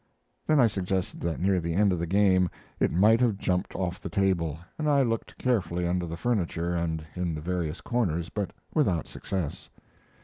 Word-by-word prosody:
Then 155 -2 +4
I 125 - +7
suggested 95 -3 -1
that 85 -1 -2
near 95 0 +2
the 85 -1 -2
end 100 0 +4
of 90 - -2
the 85 - -2
game 95 -1 +4 0.3
it - - +3
might 110 +7 +5
have 115 -5 +2
jumped 90 -2 -1
off 90 -2 -2
the - - -5
table, 85 -6 +1 0.2
and 150 -1 +1
I 140 -2 +4
looked 115 -2 -2
carefully 90 -8 0
under 90 0 0
the 85 +1 -5
furniture 90 -6 0
and 80 -2 -2
in 90 -3 -1
the 75 - -5
various 85 -1 -2
corners, 90 -8 -1
but 105 -3 -2 0.2
without 95 - +1
success. 90 -7 -4
90 Hz, 190 wpm, -28 LUFS, 85-105 Hz, 0.3 s, I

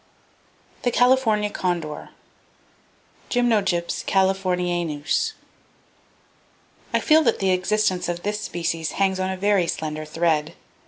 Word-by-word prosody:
The 245 - +1
California 235 -4 +3
Condor, 170 -6 -3 1.2
(Gymnogyps 210 -8 +1
californianus). 180 -5 0 1.6
—I - - +2
feel 315 0 +5
that - - +2
the 190 -1 +1
existence 185 0 +1
of 175 0 -4
this 210 +1 -2
species 165 -5 -3
hangs 190 -1 +1
on 185 0 -1
a 190 - -3
very 200 -2 +2
slender 155 -1 -4
thread. 160 0 0
185 Hz, 105 wpm, -23 LUFS, 170-210 Hz, 1.6 s, feel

